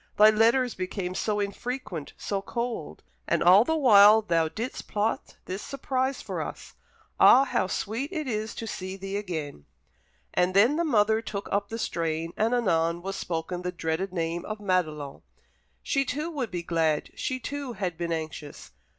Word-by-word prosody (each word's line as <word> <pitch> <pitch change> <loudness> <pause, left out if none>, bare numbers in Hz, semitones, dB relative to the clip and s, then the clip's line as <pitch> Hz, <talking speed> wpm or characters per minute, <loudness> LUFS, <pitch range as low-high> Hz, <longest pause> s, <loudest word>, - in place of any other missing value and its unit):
Thy 215 +1 +8
letters 230 +3 +3
became 185 0 -4
so 210 +2 -1
infrequent, 200 - -4
so 200 -1 -2
cold. 235 +3 -4 0.2
And - - +1
all 185 +5 +8
the 320 +6 0
while 215 -5 +7
thou 165 -5 +2
didst 230 +9 -5
plot 215 +1 -2
this 190 +2 -5
surprise 265 -1 -2
for - - -4
us. - - -7 0.5
Ah, 265 - +8
how 255 - 0
it - - -4
is - - -6
sweet 235 +8 -3 0.5
to 230 - -4
see 190 -3 -5
thee 195 +1 -5
again!" 160 - -4 0.7
And 180 +1 +1
then 230 +9 +5
the 340 - +1
mother 220 -7 +3
took 205 -3 -5
up 200 0 0
the 225 - -4
strain, 165 -4 -2
and 220 +2 +1
anon 170 -6 +1
was 195 +1 -4
spoken 175 +1 -3
the 180 0 -3
dreaded 175 +2 -2
name 170 -1 -2
of 215 - -5
Madelon. 155 -8 -1 0.6
She 275 - +1
too 300 +5 -3
would 270 -8 -3
be 175 -2 -4
glad 160 -3 0
she 255 - -3
too 280 0 -5
had 185 -5 -3
been 170 0 -3
anxious. 155 -2 -6
200 Hz, 170 wpm, -27 LUFS, 170-230 Hz, 0.7 s, Thy